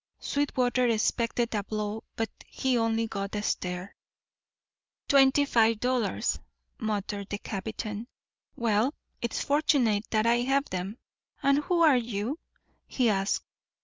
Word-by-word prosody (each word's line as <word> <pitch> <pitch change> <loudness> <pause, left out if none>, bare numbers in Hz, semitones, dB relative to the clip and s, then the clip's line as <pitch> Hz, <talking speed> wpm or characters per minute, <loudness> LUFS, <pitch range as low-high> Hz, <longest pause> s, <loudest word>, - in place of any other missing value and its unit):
Sweetwater 255 -3 +1
expected 230 +1 +1
a 210 - +1
blow, 215 +1 -3
but 225 -1 -2 0.2
he 260 -1 0
only 225 -1 +1
got 200 -2 -4
a 210 - -2
stare. 180 -1 -3 1.1
"Twenty 275 +1 +5
five 230 -4 +3
dollars," 240 -4 0 0.4
muttered 205 -3 -3
the 205 - -2
captain. 215 +2 -5 0.5
"Well, 230 +4 +1 0.3
it's 235 - -2
fortunate 265 -8 +2
that 215 0 +2
I 235 +1 +4
have 270 +3 +1
them. 190 +4 -3 0.5
And 275 +1 +4
who 350 -2 +2
are 300 -5 +6
you?" 235 +5 -2 0.5
he 245 -4 +2
asked. 195 0 0
225 Hz, 125 wpm, -28 LUFS, 210-255 Hz, 1.1 s, are